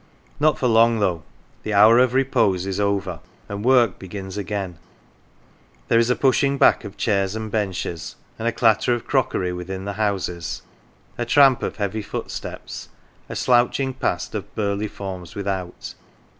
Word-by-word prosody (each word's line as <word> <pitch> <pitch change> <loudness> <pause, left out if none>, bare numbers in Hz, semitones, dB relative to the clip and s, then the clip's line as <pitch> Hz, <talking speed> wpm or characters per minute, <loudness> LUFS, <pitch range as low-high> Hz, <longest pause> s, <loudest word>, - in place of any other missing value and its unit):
Not 155 +1 +3
for - - -2
long, 115 -1 +4
though. 90 -5 0 0.4
The 105 - -3
hour 110 +4 +7
of 125 0 +3
repose 115 -9 +2
is 95 0 -3
over, 100 -4 -1 0.3
and 100 0 -5
work 120 -5 +4
begins 95 0 -7
again. 100 -4 -4 1.1
There 115 - +5
is 115 +1 +2
a 125 - +3
pushing 140 +1 +2
back - - +4
of 100 0 -9
chairs 100 -2 0
and 110 -1 -5
benches, 95 -6 -3 0.2
and 115 - -2
a - - +3
clatter 115 +1 +3
of 120 - -7
crockery 90 -1 0
within 95 +2 -6
the 100 - -3
houses, 90 -5 -2 0.6
a 120 - 0
tramp 135 0 +5
of - - -3
heavy 105 +1 -2
footsteps, 100 - -7 0.4
a - - -5
slouching 125 +2 +2
past 130 - -2
of - - -6
burly 100 0 -1
forms 95 -4 -7
without. 95 -3 -4
105 Hz, 155 wpm, -22 LUFS, 95-120 Hz, 1.1 s, hour